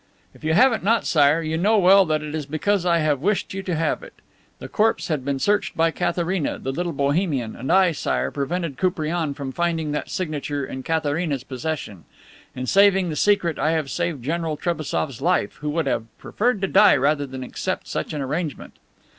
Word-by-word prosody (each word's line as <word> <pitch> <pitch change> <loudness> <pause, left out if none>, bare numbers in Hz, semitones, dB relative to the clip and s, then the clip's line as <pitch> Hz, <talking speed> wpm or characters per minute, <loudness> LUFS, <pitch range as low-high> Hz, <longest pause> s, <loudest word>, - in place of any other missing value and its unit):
"If - - -19
you 160 +1 +1
have 250 +2 +4
not 225 +1 +2
it, - - -14
Sire, 150 +1 +3
you 160 +1 -2
know 215 +5 +3
well 195 0 +6
that 155 -1 0
it 150 0 -6
is 155 -3 -4
because 180 +5 0
I 170 -1 +4
have 150 -4 +1
wished 200 +3 0
you 195 - -4
to 185 -3 -3
have 160 +1 0
it. - - -12 0.4
The - - -8
corpse 210 -7 +1
had 150 -5 -1
been 140 0 -1
searched 205 +9 0
by 165 0 +3
Katharina, 175 -1 -1
the 135 - -4
little 175 +5 -2
Bohemian, 140 - -1
and 130 +3 -4
I, 190 -2 +5
Sire, 65 - -1
prevented 155 0 -3
Koupriane 165 -4 -1
from 140 -2 -5
finding 165 0 -1
that 150 - -3
signature 145 -5 -3
in 130 - -6
Katharina's 155 -2 -1
possession. 130 - -5 0.5
In 130 - -4
saving 195 +1 +4
the - - -3
secret 180 -3 +2
I 155 +2 +2
have 155 -4 -2
saved 170 -7 -2
General 160 +1 -2
Trebassof's 155 -6 -2
life, 175 +4 0
who 150 0 -4
would 160 +1 -1
have 115 -4 -1
preferred 230 -2 -1
to 195 - +1
die - - +6
rather 145 +1 +1
than 130 -1 -7
accept 125 - -4
such - - -3
an 150 - -3
arrangement." 150 +3 -4
160 Hz, 200 wpm, -23 LUFS, 140-180 Hz, 0.5 s, well